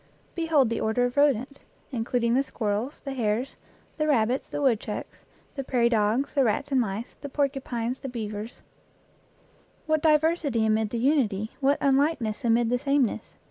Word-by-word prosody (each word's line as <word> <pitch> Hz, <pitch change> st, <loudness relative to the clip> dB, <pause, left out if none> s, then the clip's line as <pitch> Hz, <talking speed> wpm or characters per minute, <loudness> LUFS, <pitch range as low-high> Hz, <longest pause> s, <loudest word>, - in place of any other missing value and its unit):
Behold 320 Hz, -8 st, +2 dB
the 230 Hz, -, -1 dB
order 220 Hz, +3 st, +1 dB
of 245 Hz, -, -3 dB
rodents, 280 Hz, -1 st, +1 dB, 0.3 s
including 235 Hz, -1 st, 0 dB
the 260 Hz, -, +4 dB
squirrels, 225 Hz, 0 st, -3 dB
the 275 Hz, -, -5 dB
hares, 235 Hz, +1 st, -1 dB, 0.4 s
the 305 Hz, -1 st, 0 dB
rabbits, 250 Hz, -2 st, +1 dB
the -, -, -4 dB
wood 260 Hz, -7 st, +3 dB
chucks, -, -, -7 dB, 0.3 s
the 275 Hz, -, -4 dB
prairie 240 Hz, -2 st, +2 dB
dogs, 225 Hz, +4 st, +1 dB
the 275 Hz, -, +3 dB
rats 240 Hz, +4 st, 0 dB
and 265 Hz, -2 st, +3 dB
mice, 220 Hz, +1 st, -4 dB
the 285 Hz, -, -6 dB
porcupines 265 Hz, -4 st, -2 dB
the 270 Hz, -, -6 dB
beavers 215 Hz, -1 st, -6 dB, 1.2 s
what 310 Hz, -1 st, +1 dB
diversity 305 Hz, -6 st, +2 dB
amid 220 Hz, 0 st, +1 dB
the 235 Hz, -, -3 dB
unity, 230 Hz, -6 st, +1 dB
what 280 Hz, +1 st, +3 dB
unlikeness 270 Hz, -5 st, +1 dB
amid 235 Hz, 0 st, +2 dB
the 245 Hz, -, +1 dB
sameness 275 Hz, -3 st, 0 dB
250 Hz, 160 wpm, -26 LUFS, 225-280 Hz, 1.2 s, the